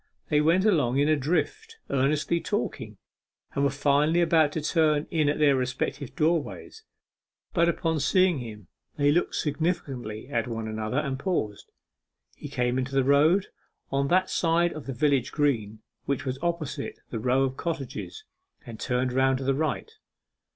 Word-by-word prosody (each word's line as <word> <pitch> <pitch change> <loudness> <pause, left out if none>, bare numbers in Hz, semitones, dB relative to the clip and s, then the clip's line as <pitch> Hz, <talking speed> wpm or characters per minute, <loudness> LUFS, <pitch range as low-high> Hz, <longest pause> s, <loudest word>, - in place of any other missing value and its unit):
They 150 0 +3
went 170 +6 +3
along 145 - +2
in 145 +1 +3
a 155 - +4
drift, 420 - -2
earnestly 150 +5 +1
talking, - - -3 0.6
and 140 - 0
were 140 - +4
finally 145 +4 +2
about 160 -3 +4
to 160 - -2
turn 155 -1 +2
in 155 -3 +2
at 145 - 0
their 145 -2 +4
respective 130 +1 -3
doorways. 165 - -1 0.7
But 170 -1 +3
upon 165 -2 0
seeing 185 +1 +3
him 105 -6 -9 0.3
they 145 0 +3
looked 175 +4 +1
significantly 135 -8 -2
at 140 -2 -1
one 115 -2 -4
another, 110 +3 -3
and 135 -3 -1
paused. 125 - -3 0.6
He - - -9
came 125 +1 0
into 135 +1 -3
the 135 - +4
road, 155 +8 +4 0.4
on 140 0 +1
that 185 +4 +3
side 170 0 +2
of 155 -3 -9
the 135 - -3
village 140 -1 +1
green 110 -8 -1 0.2
which 140 0 -2
was 130 0 -3
opposite 155 -5 -3
the 115 - -3
row 125 +4 +2
of 130 -1 -1
cottages, 160 - -5 0.4
and 115 -2 -9
turned 125 0 -1
round 130 0 +3
to 135 - -5
the 135 +1 +2
right. 155 - -2
145 Hz, 165 wpm, -27 LUFS, 130-165 Hz, 0.7 s, a